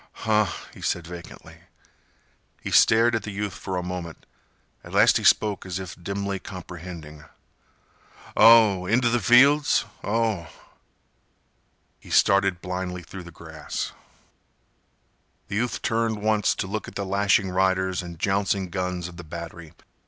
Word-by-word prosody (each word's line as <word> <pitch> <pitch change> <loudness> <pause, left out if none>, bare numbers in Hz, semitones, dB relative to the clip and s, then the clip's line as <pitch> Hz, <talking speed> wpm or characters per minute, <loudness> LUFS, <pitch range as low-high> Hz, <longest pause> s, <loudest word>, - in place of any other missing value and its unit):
"Huh," 105 -1 +2 0.2
he - - -13
said 85 -2 -2
vacantly. 85 0 -11 1.0
He - - -6
stared 115 +2 +5
at 115 - 0
the - - -7
youth 100 -1 -4
for 95 +2 -5
a 90 - -2
moment. 90 -2 -7 0.6
At - - -12
last - - +5
he - - -4
spoke 105 -3 +3
as 95 -1 -5
if 95 -2 -7
dimly 100 +2 -4
comprehending. 85 -4 -9 1.1
"Oh! 110 -5 +6
Inteh 120 +1 +2
th' 120 - -1
fields? 140 +8 +5 0.2
Oh!" 110 -5 -1 1.5
He - - -16
started 100 -2 +3
blindly 90 -1 -4
through 90 +1 -10
the - - -10
grass. 80 -1 -6 1.6
The 100 - -2
youth 120 +2 -2
turned 115 -2 -1
once 110 -1 +2
to - - -3
look 105 +3 -4
at - - -11
the 100 - -3
lashing 100 0 +2
riders 95 0 +1
and 85 -2 -9
jouncing 95 0 0
guns 90 -1 -3
of 85 -1 -12
the 85 - -8
battery. 85 0 -9
95 Hz, 140 wpm, -24 LUFS, 90-105 Hz, 1.6 s, Oh